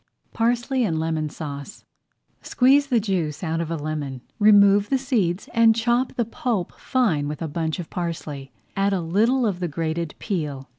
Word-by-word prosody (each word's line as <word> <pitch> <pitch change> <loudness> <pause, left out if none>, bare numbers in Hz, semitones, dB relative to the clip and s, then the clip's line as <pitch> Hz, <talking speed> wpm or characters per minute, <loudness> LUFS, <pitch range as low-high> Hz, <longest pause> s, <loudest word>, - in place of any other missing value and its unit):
PARSLEY 240 +3 +1
AND 165 -7 0
LEMON 160 -1 -1
SAUCE 145 +3 -8 0.6
Squeeze 275 +3 +3
the 245 -4 +2
juice 175 -7 -2
out 165 -1 -1
of 165 - -4
a 165 - -1
lemon, 145 -4 -4 0.2
remove 205 -1 +6
the 270 - +2
seeds, 215 -9 -1
and 230 -1 +5
chop 240 +3 +1
the 235 - -1
pulp 225 -4 -2
fine 190 - +1
with 150 0 -5
a - - -2
bunch 160 +1 -2
of 175 -3 -7
parsley. 155 -6 -5 0.2
Add 195 0 +1
a 185 - 0
little 225 +10 +2
of 195 -5 -1
the 180 - -1
grated 165 +1 -3
peel. 150 -9 -4
180 Hz, 175 wpm, -23 LUFS, 155-230 Hz, 0.6 s, remove